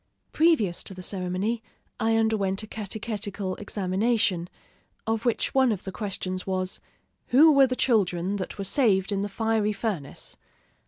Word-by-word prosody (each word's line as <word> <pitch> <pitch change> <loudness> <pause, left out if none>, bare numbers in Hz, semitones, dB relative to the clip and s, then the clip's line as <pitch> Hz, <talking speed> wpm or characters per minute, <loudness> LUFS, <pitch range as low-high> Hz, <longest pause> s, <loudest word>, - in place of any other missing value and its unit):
Previous 300 - +2
to 190 - -4
the 185 - -8
ceremony, 190 +5 -1 0.4
I 225 0 +2
underwent 215 -3 +1
a - - -7
catechetical 205 -2 -4
examination, 200 -2 0 0.6
of 225 +1 -1
which 240 - 0
one 265 -2 +4
of 200 -4 -3
the 190 - -5
questions 185 -2 -4
was, 185 +1 -2 0.5
"Who 300 +6 +7
were 275 -2 +6
the 255 - -2
children 195 -6 +1
that 185 - -5
were 200 - -3
saved 195 -3 +3
in 195 -1 0
the 205 - -2
fiery 220 0 0
furnace?" 200 -9 -4
205 Hz, 150 wpm, -26 LUFS, 190-225 Hz, 0.6 s, Who